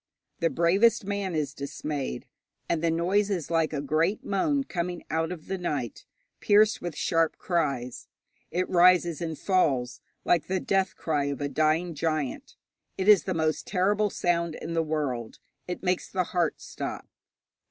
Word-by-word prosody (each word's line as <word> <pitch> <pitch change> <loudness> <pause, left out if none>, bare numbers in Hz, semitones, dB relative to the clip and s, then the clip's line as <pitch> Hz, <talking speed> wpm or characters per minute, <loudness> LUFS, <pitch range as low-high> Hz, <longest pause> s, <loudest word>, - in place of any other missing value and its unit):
The 165 - +2
bravest 195 +7 +3
man 200 -3 -2
is 150 -2 -1
dismayed. 140 - -4 0.4
And 165 -2 0
the 165 - +3
noise 185 +5 +1
is 175 -6 -2
like 165 -1 +2
a 145 -3 -2
great 165 +8 +1
moan 275 +9 +1
coming 175 -6 -4
out 160 +1 0
of 170 -4 -7
the 190 0 -3
night, 140 - -4 0.3
pierced 210 +1 +4
with 175 -4 -4
sharp 165 -2 +1
cries. 140 -8 -2 0.4
It 180 +1 -1
rises 175 -2 +4
and 160 -2 -3
falls, 135 -10 +1 0.2
like 165 -3 +2
the 190 0 0
death 190 +1 0
cry 150 -3 -1
of 140 -2 -3
a 145 0 -2
dying 155 +4 +1
giant. 155 -3 -2 0.4
It 190 - -2
is 210 -3 +7
the 185 - -1
most 155 -1 0
terrible 205 +2 +2
sound 170 -3 0
in 165 - -6
the 165 - +2
world. 145 -7 -3 0.3
It 180 +1 -5
makes 180 -1 0
the 185 -1 0
heart 175 -2 -1
stop. - - -6
170 Hz, 165 wpm, -27 LUFS, 155-185 Hz, 0.4 s, is